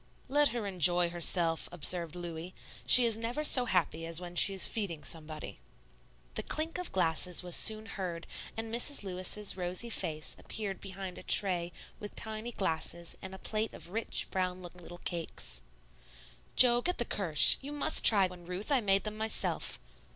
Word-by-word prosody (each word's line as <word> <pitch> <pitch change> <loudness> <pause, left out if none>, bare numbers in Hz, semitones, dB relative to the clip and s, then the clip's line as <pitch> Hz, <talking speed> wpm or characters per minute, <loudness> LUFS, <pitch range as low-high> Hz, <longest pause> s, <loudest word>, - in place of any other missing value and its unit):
"Let 290 +1 +3
her 235 -5 -4
enjoy 175 -2 +5
herself," 170 -1 0
observed 175 0 -1
Louis; 175 0 -8 0.3
"she 250 - +5
is 225 -2 0
never 235 +6 -4
so 255 -4 +4
happy 170 -6 -1
as 165 0 +4
when 175 -1 -9
she 190 - +8
is 190 -1 +6
feeding 185 -9 -3
somebody." 155 - -5 0.7
The - - -2
clink 320 +3 -3
of 360 - -5
glasses 180 0 0
was 180 -1 -2
soon 220 0 +2
heard, 180 -6 -6 0.3
and 225 0 -5
Mrs. 245 +2 -2
Lewis's 190 +2 -3
rosy 185 +5 -4
face 155 -6 -3
appeared 200 -3 -4
behind 190 -1 -7
a - - -10
tray 175 -3 +4 0.3
with 210 -2 -9
tiny 220 +2 -4
glasses 170 -3 -3
and 190 0 -8
a - - -10
plate 215 +3 -3
of 175 - -11
rich, 225 +3 -1
brown 185 -1 -3
looking 175 0 -11
little 175 +1 -11
cakes. 160 - -5 0.9
"Jo, 240 -1 +5
get 360 +7 -2
the 240 - -1
Kirsch. 170 -10 +4
You 280 +2 -8
must 295 -1 +4
try 200 -4 +7
one, 180 -2 -9
Ruth; 185 +8 -6
I 270 -3 +2
made 195 -2 +1
them 215 0 -6
myself." 220 0 +2
185 Hz, 175 wpm, -30 LUFS, 175-220 Hz, 0.9 s, she